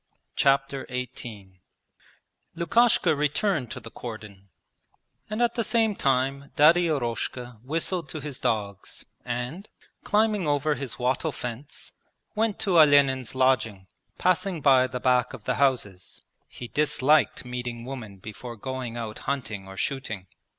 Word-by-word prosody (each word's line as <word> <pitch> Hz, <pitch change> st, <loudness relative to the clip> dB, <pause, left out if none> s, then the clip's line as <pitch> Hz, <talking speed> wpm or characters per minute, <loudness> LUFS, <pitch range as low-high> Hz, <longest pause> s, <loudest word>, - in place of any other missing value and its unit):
Chapter 135 Hz, 0 st, +2 dB
XVIII 115 Hz, -7 st, -7 dB, 0.9 s
Lukasha 175 Hz, -1 st, +3 dB
returned 150 Hz, -, 0 dB
to 130 Hz, -, -6 dB
the 115 Hz, -1 st, -11 dB
cordon 105 Hz, -4 st, -9 dB, 0.8 s
and 215 Hz, +3 st, 0 dB
at 235 Hz, -1 st, +2 dB
the 230 Hz, -, -1 dB
same 225 Hz, -2 st, +2 dB
time 135 Hz, 0 st, 0 dB
Daddy 170 Hz, +4 st, +6 dB
Eroshka 125 Hz, -4 st, -3 dB
whistled 165 Hz, +3 st, -2 dB
to 155 Hz, -, -4 dB
his 145 Hz, -3 st, -6 dB
dogs 100 Hz, -3 st, -3 dB, 0.2 s
and, 125 Hz, -, -4 dB, 0.3 s
climbing 210 Hz, -4 st, +2 dB
over 145 Hz, +1 st, +2 dB
his 140 Hz, -3 st, -5 dB
wattle 130 Hz, +5 st, 0 dB
fence, 125 Hz, +3 st, -7 dB, 0.4 s
went 220 Hz, -1 st, 0 dB
to 185 Hz, -5 st, +4 dB
Olenin's 140 Hz, -5 st, +5 dB
lodging, 115 Hz, -7 st, +2 dB, 0.3 s
passing 185 Hz, -1 st, +1 dB
by 135 Hz, -3 st, +5 dB
the 125 Hz, -, -5 dB
back 125 Hz, -1 st, +2 dB
of -, -, -9 dB
the 125 Hz, -, 0 dB
houses 105 Hz, -9 st, 0 dB, 0.2 s
(he 120 Hz, -, -9 dB
disliked 150 Hz, 0 st, +2 dB
meeting 120 Hz, -1 st, -5 dB
women 120 Hz, -7 st, -7 dB
before 110 Hz, +5 st, -8 dB
going 125 Hz, 0 st, -5 dB
out 110 Hz, -2 st, -5 dB
hunting 105 Hz, -8 st, -3 dB
or 95 Hz, 0 st, -10 dB
shooting). 110 Hz, -8 st, -3 dB
130 Hz, 130 wpm, -26 LUFS, 120-155 Hz, 0.9 s, Daddy